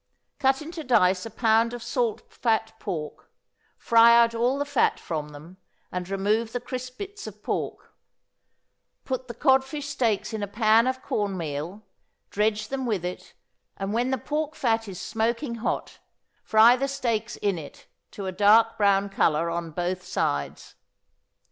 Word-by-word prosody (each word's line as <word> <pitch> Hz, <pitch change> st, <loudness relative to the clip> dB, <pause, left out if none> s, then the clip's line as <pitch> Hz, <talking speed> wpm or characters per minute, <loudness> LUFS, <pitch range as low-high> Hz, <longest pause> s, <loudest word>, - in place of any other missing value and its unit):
Cut 270 Hz, +1 st, +2 dB
into 325 Hz, +1 st, -7 dB
dice 195 Hz, -6 st, +3 dB
a -, -, -8 dB
pound 225 Hz, +2 st, +2 dB
of 240 Hz, -, -8 dB
salt 230 Hz, -3 st, -1 dB
fat 225 Hz, -1 st, 0 dB
pork, 160 Hz, -7 st, -6 dB, 0.5 s
fry 235 Hz, 0 st, +6 dB
out 230 Hz, -1 st, +4 dB
all 240 Hz, +4 st, +1 dB
the 285 Hz, -, -1 dB
fat 285 Hz, -3 st, +1 dB
from 155 Hz, -3 st, -4 dB
them, 155 Hz, +5 st, -13 dB, 0.3 s
and 180 Hz, 0 st, -4 dB
remove 210 Hz, +4 st, 0 dB
the 245 Hz, -, -1 dB
crisp 255 Hz, +1 st, -7 dB
bits 410 Hz, +1 st, -7 dB
of -, -, -11 dB
pork; -, -, -4 dB, 1.1 s
put 260 Hz, -1 st, -3 dB
the 235 Hz, -, -7 dB
codfish 265 Hz, +4 st, +2 dB
steaks 235 Hz, -6 st, 0 dB
in 220 Hz, -, -3 dB
a 205 Hz, -, -2 dB
pan 220 Hz, +3 st, +3 dB
of 260 Hz, 0 st, -2 dB
corn 200 Hz, -3 st, -1 dB
meal, 165 Hz, +5 st, -5 dB, 0.5 s
dredge 210 Hz, +1 st, 0 dB
them 265 Hz, -2 st, -3 dB
with 200 Hz, -6 st, -1 dB
it, 180 Hz, -, -7 dB, 0.4 s
and, 195 Hz, +1 st, -3 dB
when 240 Hz, +3 st, +1 dB
the 265 Hz, -, 0 dB
pork 305 Hz, +5 st, -3 dB
fat 225 Hz, -3 st, 0 dB
is 190 Hz, -2 st, -7 dB
smoking 235 Hz, +4 st, -1 dB
hot, -, -, -3 dB, 0.4 s
fry 225 Hz, +3 st, +6 dB
the 275 Hz, +2 st, -1 dB
steaks 235 Hz, -5 st, -2 dB
in 200 Hz, -4 st, -1 dB
it 145 Hz, -, -12 dB, 0.2 s
to 200 Hz, -, -7 dB
a 190 Hz, -, -2 dB
dark 215 Hz, +4 st, +4 dB
brown 200 Hz, -1 st, +3 dB
color 170 Hz, -4 st, +1 dB
on 170 Hz, 0 st, -3 dB
both 175 Hz, +3 st, -2 dB
sides. 70 Hz, -, -2 dB
225 Hz, 160 wpm, -26 LUFS, 195-250 Hz, 1.1 s, fry